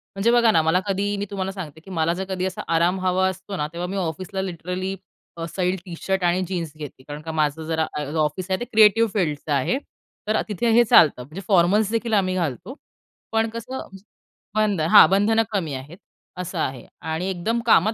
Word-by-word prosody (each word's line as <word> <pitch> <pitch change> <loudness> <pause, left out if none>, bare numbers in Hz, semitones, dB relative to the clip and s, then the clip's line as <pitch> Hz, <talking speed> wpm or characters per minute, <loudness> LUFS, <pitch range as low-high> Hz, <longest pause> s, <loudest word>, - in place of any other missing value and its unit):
म्हणजे 200 +4 +2
बघा 235 -2 +5
ना, 165 - +4
मला 160 +3 +2
कधी 200 +1 0
मी 205 - -2
तुम्हाला 190 -1 -3
सांगते 165 -6 -8
की 190 - -13
मला 165 -1 +1
जर 185 +2 -3
कधी 185 -1 -2
असा 190 0 -4
आराम 175 +3 +2
हवा 185 +1 +2
असतो 190 +2 -7
ना, 150 -2 -1
तेव्हा 175 +1 -3
मी 195 +2 -4
ऑफिसला 185 +2 -3
लिटरली 185 +1 -4 0.4
अ, 165 - -4
सैल 185 -1 0
टी 180 - -8
शर्ट 190 -1 -1
आणि 175 +1 +2
जीन्स 170 -4 -3
घेते 145 -4 -9
कारण 145 +2 -8
का 160 - -5
माझं 155 0 0
जरा 160 -1 0 0.4
ऑफिस 155 +5 -2
आहे 190 - +1
ते 240 - -3
क्रिएटिव्ह 220 -1 +5
फील्डचं 155 -7 -1
आहे 140 - +1 0.5
तर 215 0 +2
तिथे 220 +3 -1
हे 235 +2 +6
चालतं, 155 - +5
म्हणजे 155 +9 -9
फॉर्मल्सदेखील 210 +5 +2
आम्ही 185 -3 +2
घालतो. 175 - -3 0.6
पण 225 0 +1
कसं 230 +3 -6 0.7
बंध 210 -5 +2
हां, 155 - +8
बंधनं 210 +4 +3
कमी 175 -8 -2
आहेत, 135 +6 -8 0.4
असं 180 0 -5
आहे 130 -5 -3 0.3
आणि 170 +4 -2
एकदम 195 +6 -1
कामात 220 -1 +4
185 Hz, 195 wpm, -23 LUFS, 165-205 Hz, 0.7 s, हां